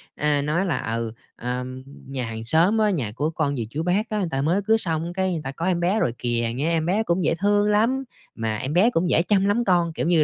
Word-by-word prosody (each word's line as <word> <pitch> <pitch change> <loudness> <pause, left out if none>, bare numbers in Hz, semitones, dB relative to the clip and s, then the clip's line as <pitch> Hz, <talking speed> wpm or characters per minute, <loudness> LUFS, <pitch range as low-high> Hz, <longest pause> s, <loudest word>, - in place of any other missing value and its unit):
a, 150 -1 +1
nói 155 +6 0
là: 145 -10 -2
"Ừ, 115 -1 -3 0.2
ờm, 125 +1 -5 0.2
nhà 130 -2 -4
hàng 110 0 -6
xóm 165 - +3
á, 215 -1 +3
nhà 135 - -1
của 145 +8 -1
con 155 -3 -1
dì, 115 -4 -3
chú, 150 +7 -3
bác 195 +6 0
á, 215 - -2
người 190 - 0
ta 135 - -1
mới 170 +8 +1
cưới 220 +3 +3
xong 165 -3 -1
cái 190 0 0
người 165 -3 -2
ta 135 - -4
có 165 +5 -5
em 185 -2 +1
bé 180 +5 +1
rồi 120 - +1
kìa, 120 -1 -1
nghe 145 +6 0
em 160 -1 +1
bé 195 +6 +1
cũng 180 -3 0
dễ - - +2
thương 205 +1 +2
lắm, 235 +6 +2 0.3
mà 110 -1 -2
em 135 +7 -3
bé 190 +7 +5
cũng 175 -6 0
dễ 165 - +4
chăm 195 +2 +2
lắm 205 +4 +2
con." 175 -3 +2
Kiểu 160 - -2
như 170 -3 +4
165 Hz, 270 wpm, -23 LUFS, 135-195 Hz, 0.3 s, bé